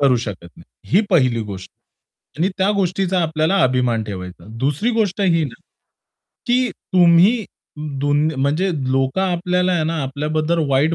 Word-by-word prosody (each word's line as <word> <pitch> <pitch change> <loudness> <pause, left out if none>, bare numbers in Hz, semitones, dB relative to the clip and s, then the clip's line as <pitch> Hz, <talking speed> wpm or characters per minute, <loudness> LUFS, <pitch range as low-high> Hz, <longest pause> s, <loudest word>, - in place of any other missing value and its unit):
करू 135 -3 +4
शकत 100 -7 -6
नाही. - - -13 0.3
ही 195 - +6
पहिली 130 -9 +3
गोष्ट 95 -1 -8
आहे. - - -59 0.6
आणि 190 - +3
त्या 190 +2 +2
गोष्टीचा 190 0 0
आपल्याला 160 +3 +1
अभिमान 125 -3 +1
ठेवायचा. 90 -4 -8
दुसरी 145 - 0
गोष्ट 215 -4 0
ही 165 -5 +2
ना, 125 - -6 0.9
की 250 +1 +2
तुम्ही 185 +5 +3 0.6
2 145 +2 +2
म्हणजे 155 +8 +1 0.2
लोक 135 +3 0
आपल्याला 180 0 0
आहे 170 -3 +1
ना, 160 -1 -2
आपल्याबद्दल 155 +4 -1
वाईट 140 +5 +2
160 Hz, 150 wpm, -19 LUFS, 130-185 Hz, 0.9 s, ही